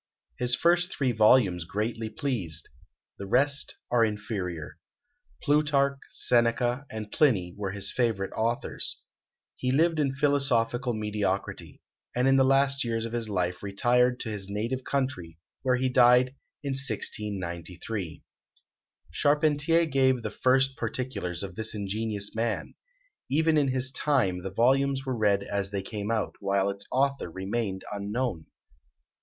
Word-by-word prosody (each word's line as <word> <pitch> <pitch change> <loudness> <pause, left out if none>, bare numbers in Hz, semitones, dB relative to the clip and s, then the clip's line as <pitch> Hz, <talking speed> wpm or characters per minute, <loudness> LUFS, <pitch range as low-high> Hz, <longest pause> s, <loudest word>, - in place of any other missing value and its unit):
His 125 0 +2
first 175 +2 +2
three 135 -3 0
volumes 105 -5 +4
greatly 110 +5 -3
pleased: 100 - -2 0.5
the 100 - -6
rest 140 +6 +1 0.2
are 120 -1 +4
inferior. 95 -7 -3 0.6
Plutarch, 145 -2 +2
Seneca, 120 +3 +2
and 110 -1 -6
Pliny, 95 - +2
were 100 -1 -3
his 100 0 -2
favourite 110 -6 -1
authors. 115 +2 -2 0.6
He 125 - -2
lived 160 +3 +2
in 135 -3 +1
philosophical 135 -4 +2
mediocrity; 105 -2 -3 0.3
and 125 +2 +2
in 135 - +5
the 135 - +5
last 135 0 +3
years 115 -1 -2
of 115 - -6
his 115 -2 -2
life 90 -2 -1
retired 125 +5 +2
to 115 - -4
his 100 -2 -5
native 115 +6 -2
country, 130 -14 -2 0.2
where 130 -1 +2
he 130 +1 0
died 125 0 +5 0.3
in 140 - -2
1693. 100 - -3 0.9
Charpentier 150 - +2
gave 130 -4 +2
the 110 - -3
first 135 +3 +2
particulars 125 - -3
of 95 -2 -6
this 110 +3 -4
ingenious 105 0 -3
man. 115 0 -2 0.6
Even 160 +3 +3
in 145 -2 +3
his 130 0 +1
time 125 -13 +1
the 95 - -4
volumes 135 +6 +2
were 130 -1 -1
read 100 -3 +2
as 100 -1 -2
they 100 -1 -3
came 105 0 -5
out, 110 -2 -1
while 100 0 +1
its 100 0 -8
author 140 -5 +1
remained 95 +2 -3
unknown. 105 -3 -3
115 Hz, 140 wpm, -27 LUFS, 100-135 Hz, 0.9 s, in